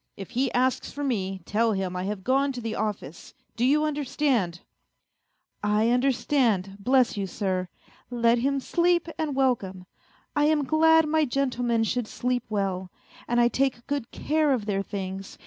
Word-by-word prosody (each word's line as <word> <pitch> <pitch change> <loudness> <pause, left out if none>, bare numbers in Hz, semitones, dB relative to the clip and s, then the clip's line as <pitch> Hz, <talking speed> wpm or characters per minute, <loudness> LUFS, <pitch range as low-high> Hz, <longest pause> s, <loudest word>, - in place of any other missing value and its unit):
If 195 - -8
he 260 +1 0
asks 255 +1 +1
for 290 - -5
me, 195 -8 -2
tell 225 +1 +1
him 190 -2 -2
I 180 +1 -3
have 200 -1 -4
gone 275 +4 +2
to 250 - -5
the 225 -1 -3
office 195 -9 -5 0.2
do 235 - -1
you 295 +4 +3
understand? 275 - 0 0.4
" - - -53
" - - -48
I 210 +2 +2
understand, 245 -6 +1
bless 250 +1 +2
you, 195 -1 -2
sir; 185 -1 -2 0.4
let 235 -1 +2
him 275 +3 +1
sleep 345 +4 +1
and 305 -3 -1
welcome! 205 -9 0 0.5
I 295 0 +3
am 305 -1 +3
glad 320 +2 +4
my 315 +1 +2
gentlemen 245 -3 0
should 240 0 -1
sleep 250 +1 -2
well, 190 -3 -2 0.4
and 240 0 +1
I 240 - +5
take 255 -1 -1
good 280 -4 -3
care 305 -1 +1
of 230 -5 -2
their 200 -2 0
things. 195 -1 -6
240 Hz, 170 wpm, -26 LUFS, 200-275 Hz, 0.5 s, I